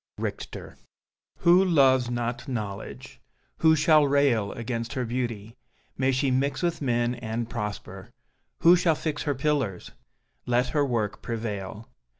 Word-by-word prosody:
Richter - - -6 0.6
Who 175 +2 +6
loves 135 -8 +4
not 120 +2 -3
Knowledge? 105 -6 -6 0.4
Who 160 -1 +5
shall 150 -1 +4
rail 135 -7 +2
Against 115 +1 -4
her 130 -3 -2
beauty? 115 -2 -4 0.4
May 135 0 +1
she 130 +1 +1
mix 135 +4 0
With 170 -2 -1
men 120 -2 +1
and 115 -1 -4
prosper! 105 -3 -6 0.5
Who 170 +2 +7
shall 175 -3 +2
fix 150 -1 -3
Her 145 -2 -1
pillars? 130 -9 -1 0.6
Let 125 +1 +2
her 145 +3 +1
work 115 -6 -2
prevail. 110 -2 -5
125 Hz, 135 wpm, -26 LUFS, 115-145 Hz, 0.6 s, Who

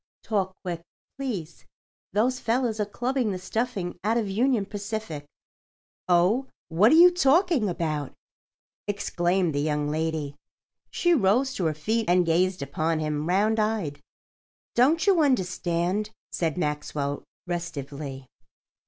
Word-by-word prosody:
Talk 190 -3 -1
quick, 175 -3 -4 0.4
please—those 230 - -4
fellows 230 -2 0
are 210 - 0
clubbing 245 +2 -1
the 185 - -3
stuffing 195 -1 -3
out 220 +3 +2
of 225 -3 0
Union 225 +2 +1
Pacific." 205 -7 -5 0.8
"Oh, 185 +10 +3 0.2
what 190 +8 +5
are - - +7
you 350 +2 +9
talking 330 - +3
about?" 155 -5 -2 0.8
exclaimed 180 -3 0
the 145 - 0
young 150 -1 0
lady. 155 -2 -2 0.5
She 350 -1 +2
rose 255 - +3
to 190 -9 -2
her 155 -1 +1
feet 220 +8 -1
and 180 0 +4
gazed 180 +1 +1
upon 155 +4 -1
him, 150 +1 -2
round 210 +4 +2
eyed. 210 -9 -1 0.7
"Don't 295 +8 +3
you 385 -5 +5
understand?" 185 - 0 0.2
said 165 -2 -1
Maxwell, 150 -3 -2 0.3
restively. 140 -5 -5
190 Hz, 125 wpm, -26 LUFS, 160-230 Hz, 0.8 s, you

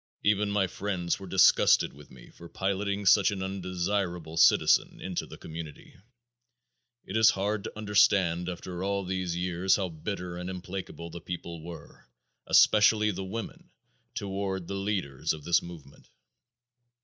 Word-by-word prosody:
Even 105 0 +2
my 100 -1 +2
friends 90 -2 -3
were 95 - -9
disgusted 95 -6 +4
with 70 +1 -15
me 65 -2 -15
for 85 - -13
piloting 100 +1 -2
such 100 +1 +6
an 95 -2 -3
"undesirable 90 -3 -3
citizen" 85 - +4
into 90 -2 -4
the - - -11
community. 80 -2 -9 1.1
It 95 - -6
is 110 -1 +6
hard 100 +1 -1
to - - -7
understand, 95 -4 +2
after 90 0 -6
all 100 0 -1
these 90 -2 -2
years, 90 +1 +1
how 95 -3 -2
bitter 90 +2 -5
and 90 +1 -5
implacable 90 -2 -7
the 85 +1 -8
people 85 -2 -6
were, 85 +1 -11 0.4
especially 105 0 +5
the 95 0 -5
women, 110 +4 -7 0.5
toward 95 -2 -3
the - - -5
leaders 95 -7 -2
of 75 -2 -9
this 85 +2 +3
movement. 85 -5 -13
95 Hz, 145 wpm, -28 LUFS, 85-100 Hz, 1.1 s, such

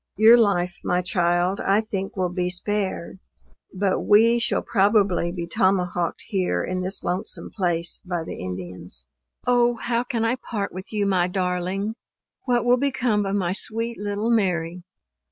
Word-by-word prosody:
Your 220 +2 +8
life, 185 -6 +1
my 180 0 0
child, 175 +1 +1
I 200 +2 +3
think 195 -3 -4
will 180 -1 -1
be 180 -1 -1
spared; 190 -1 -2 0.5
but 190 0 0
we 230 +3 +4
shall 235 - 0
probably 200 -4 +2
be 175 -1 -4
tomahawked 180 -1 0
here 190 -4 -1
in 185 0 -3
this 190 +2 -1
lonesome 180 +5 -3
place 175 -4 0
by 175 -3 -3
the - - -7
Indians. 90 -7 -6 0.4
O! 240 -1 +3
how 235 +1 -1
can 240 -3 -2
I 240 +3 +1
part 210 -5 -4
with 185 +1 -8
you 210 -2 0
my 185 -3 +2
darling? 185 +3 -2 0.5
What 245 -2 +1
will 245 +1 +5
become 245 -6 0
of 195 - -1
my 185 -3 0
sweet 230 +3 +1
little 205 +2 -1
Mary? 180 -5 0
195 Hz, 155 wpm, -23 LUFS, 180-220 Hz, 0.5 s, Your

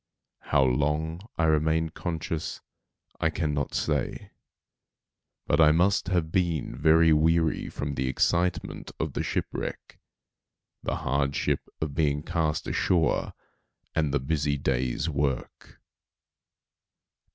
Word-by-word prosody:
How 70 -2 +2
long 75 +6 0 0.2
I 85 - +1
remained 80 +1 +2
conscious 80 -2 -4 0.6
I 80 - +2
cannot 75 -3 -2
say; - - -2 1.1
but - - +3
I 75 -1 +7
must 90 +1 +2
have 85 -4 0
been 85 -9 0
very 80 +3 +5
weary 80 +1 +2
from 70 0 -4
the 65 -1 -1
excitement 85 +7 0
of - - -2
the - - -1
ship - - -1
wreck, - - -6 0.8
the - - -2
hardship 70 +1 0
of 75 -2 -2
being 75 -2 +1
cast 80 -3 -1
ashore 85 -3 +1 0.6
and 75 -3 +1
the 70 - +1
busy 70 +1 0
day's 65 +1 -1
work. 70 -4 -3
80 Hz, 115 wpm, -27 LUFS, 70-80 Hz, 1.1 s, I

